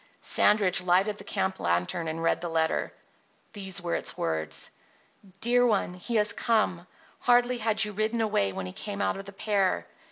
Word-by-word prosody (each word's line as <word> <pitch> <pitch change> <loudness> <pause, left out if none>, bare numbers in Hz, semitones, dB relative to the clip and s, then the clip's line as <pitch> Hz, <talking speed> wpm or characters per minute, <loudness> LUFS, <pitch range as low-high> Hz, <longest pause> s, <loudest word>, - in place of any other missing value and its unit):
Sandridge 200 -4 +4
lighted 190 +4 +2
the - - -9
camp 190 -1 -2
lantern 90 - -1
and 160 +1 -4
read 165 - +1
the 175 - -3
letter. 160 -1 0 0.6
These 190 -4 -2
were 170 - -2
its - - -2
words: 80 -1 -2 0.7
Dear 245 +1 +3
One: 205 -5 +1
He 185 +6 -5
has 210 -1 +3
come. 195 -7 0 0.3
Hardly 245 0 +3
had 220 -1 +1
you 210 - -5
ridden 215 +3 -1
away 205 - +1
when 95 0 -5
he 90 - -7
came 200 - -5
out 200 - 0
of 195 - -8
the 200 - -9
pear. 195 - 0
195 Hz, 180 wpm, -27 LUFS, 165-215 Hz, 0.7 s, Sandridge